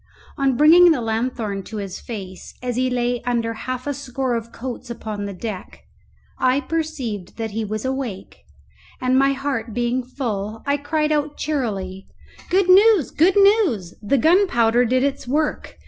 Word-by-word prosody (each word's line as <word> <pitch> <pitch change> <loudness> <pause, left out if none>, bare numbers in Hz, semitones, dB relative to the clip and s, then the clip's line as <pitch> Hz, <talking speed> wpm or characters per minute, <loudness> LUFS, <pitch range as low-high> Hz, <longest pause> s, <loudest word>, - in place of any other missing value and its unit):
On 270 -3 +1
bringing 340 +5 +7
the 315 -6 +3
lanthorn 225 -3 -2
to 220 - -7
his 195 -2 -5
face 190 -5 -8
as 245 -1 -2
he 255 +1 +1
lay 245 -1 -1
under 235 -2 -1
half 255 +2 -5
a 290 - -1
score 265 -2 -3
of 230 0 -4
coats 250 0 -7
upon 215 -3 -5
the 200 - -4
deck, 195 0 -7 0.6
I 255 +2 +3
perceived 270 - -4
that 225 -2 -3
he 220 +2 -2
was 215 +2 -4
awake, 260 -7 -4 0.6
and, 255 0 +1
my 275 +1 +4
heart 265 -5 -3
being 240 +1 0
full, 225 -5 -4
I 280 0 +1
cried 305 +1 -1
out 295 -1 -1
cheerily, 200 -10 -3 0.4
"Good 375 +1 +3
news! 385 - +6
good 355 +5 +3
news! 395 - +3
the 220 +6 +1
gunpowder 250 - +3
did 255 +2 +1
its 280 -2 -2
work! 300 +4 -1
250 Hz, 160 wpm, -21 LUFS, 225-285 Hz, 0.6 s, bringing